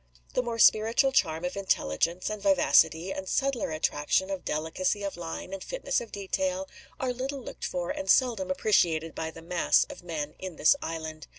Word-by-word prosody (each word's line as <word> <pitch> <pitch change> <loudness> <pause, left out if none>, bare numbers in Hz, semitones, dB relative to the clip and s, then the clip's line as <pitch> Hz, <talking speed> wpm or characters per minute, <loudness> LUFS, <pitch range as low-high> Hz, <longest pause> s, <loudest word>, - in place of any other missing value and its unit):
The - - +2
more 235 -2 -4
spiritual 225 +5 +5
charm 165 -9 +1
of 180 - -3
intelligence 175 - 0
and 215 -1 -5
vivacity, 190 -2 +4
the 190 0 -6
subtler 270 +3 0
attraction 155 +4 0
of 190 -2 -4
delicacy 180 +6 -1
of 200 - -3
line 175 +2 -6
and 195 - -5
fitness - - -1
of 230 - -9
detail, 280 +8 -2 0.3
are 255 -1 -1
little 265 +2 -4
looked - - -7
for 175 -1 -2
and 190 - -5
seldom 225 -8 +3
appreciated 165 -5 +2
by 160 - -4
the 165 0 -12
mass 175 +1 +3
of - - -10
men 155 -4 -4
in 185 -3 -6
this 155 - +5
island. 160 -1 -5
185 Hz, 180 wpm, -28 LUFS, 165-225 Hz, 0.3 s, spiritual